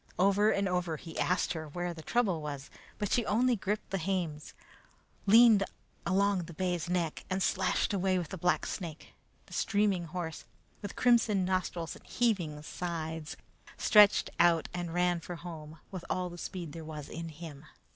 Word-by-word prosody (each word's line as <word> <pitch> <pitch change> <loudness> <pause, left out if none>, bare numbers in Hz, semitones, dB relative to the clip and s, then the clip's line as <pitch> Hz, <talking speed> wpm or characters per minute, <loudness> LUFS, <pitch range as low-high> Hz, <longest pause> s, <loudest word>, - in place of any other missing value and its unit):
Over 200 +3 +4
and 200 -2 +1
over 180 -3 -1
he 165 +1 -8
asked 180 0 +1
her 160 -2 -5
where 175 +3 -3
the 165 - -9
trouble 195 -4 +1
was, 140 -2 -6 0.3
but 205 - -2
she 240 - +3
only 245 +4 +3
gripped 210 0 -3
the 195 - 0
hames, 165 -4 -3 0.7
leaned 220 -1 +8 0.4
along 195 -1 +2
the 170 - -11
bay's 175 -1 -1
neck, 175 -3 -1
and 190 0 0
slashed 190 +1 +1
away 190 -1 +2
with 170 -4 -3
the 190 - -5
blacksnake. 175 -1 -2 0.3
The - - -14
steaming 200 -4 +1
horse, 165 -1 -5 0.4
with 205 - -6
crimson 230 -6 +3
nostrils 180 -2 -1
and - - -15
heaving 175 -11 0
sides, 160 -2 -4 0.4
stretched 210 -2 +6
out 170 -2 +4
and 175 -1 -3
ran 175 0 +2
for 175 +1 -7
home 160 -2 -9
with 185 -3 -6
all 180 -1 -1
the 175 - -9
speed 170 -2 -5
there 165 - -7
was 150 -2 -7
in 165 0 -6
him. 155 -2 -9
180 Hz, 165 wpm, -31 LUFS, 165-195 Hz, 0.7 s, leaned